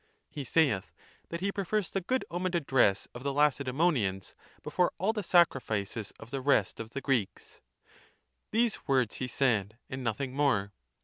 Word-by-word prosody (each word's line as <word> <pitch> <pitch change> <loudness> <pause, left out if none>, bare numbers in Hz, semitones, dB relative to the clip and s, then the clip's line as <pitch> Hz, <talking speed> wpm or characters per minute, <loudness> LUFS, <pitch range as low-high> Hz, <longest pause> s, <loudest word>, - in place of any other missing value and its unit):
He 145 - -5
saith, 130 - +1 0.4
that 170 +1 -5
he 200 +1 0
prefers 200 0 -1
the 195 - -1
good 255 +8 -1
omened 175 +1 -1
address 130 - +2
of 120 - -8
the 140 +1 -1
La 145 +2 +5
cedeemonians 130 - 0 0.3
before 180 -1 +1
all 200 +5 +1
the 215 - -2
sacrifices 115 - +1
of 110 - -12
(the 135 -1 -2
rest 130 -8 +2
of)" 115 -1 -6
the 140 +4 -5
Greeks.—These 115 - -4
words 130 -5 +2
he 130 - -3
said, 115 -5 0
and 130 0 -4
nothing 125 +3 -2
more. 120 -8 +1
135 Hz, 160 wpm, -30 LUFS, 110-170 Hz, 0.4 s, La